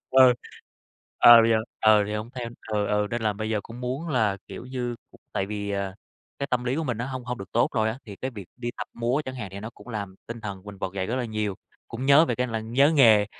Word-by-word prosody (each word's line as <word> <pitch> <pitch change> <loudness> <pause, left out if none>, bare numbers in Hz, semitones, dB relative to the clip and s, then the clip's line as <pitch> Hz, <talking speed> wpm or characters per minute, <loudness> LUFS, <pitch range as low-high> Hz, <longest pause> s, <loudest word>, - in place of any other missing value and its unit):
Ừ, 130 -1 +8 0.9
ờ, 120 -1 +10
bây 115 - +3
giờ, 115 - +5 0.2
ờ, 110 -1 +6
thì 105 - -4
hông 110 +2 -4
theo. 125 -2 -4 0.2
Ừ, 105 -1 +1
ừ, 105 0 +1
nên 120 -1 -2
là 110 -1 +2
bây 110 +2 -4
giờ 105 -2 +1
cũng 115 +4 -10
muốn 130 +7 -3
là, 110 -9 +2
kiểu - - -8
như, 125 -2 -3
cũng - - -19
tại 95 - -1
vì, 100 -1 -4
à, 100 -1 -2 0.4
cái 140 - -2
tâm 125 -1 0
lý 125 +2 0
của 160 - -1
mình 125 -6 -1
nó 125 - -2
hông 130 -2 -5
hông 125 -1 -4
được 95 -1 -9
tốt - - +3
rồi 110 0 +2
á. 115 - -3
Thì 100 -3 -9
cái 130 - -4
việc 105 -7 -9
đi 120 -1 -3
tập - - -5
múa 120 +5 0
chẳng 130 - -5
hạn 110 -6 -5
thì 100 - -6
nó 110 +2 -6
cũng 125 - -16
làm 100 -4 -5
tinh 115 0 -6
thần 100 -3 -6
mình 100 -2 -9
vực 95 0 -4
dậy 95 -1 -2
rất 120 - -2
là 125 - -1
nhiều, 110 -3 -2 0.3
cũng 125 +3 -4
nhớ 140 +4 +7
về 120 - -1
cái 125 +2 0
là 115 -2 -3
nhớ 125 +7 +3
nghề, 110 -7 +6
115 Hz, 280 wpm, -26 LUFS, 105-125 Hz, 0.9 s, ờ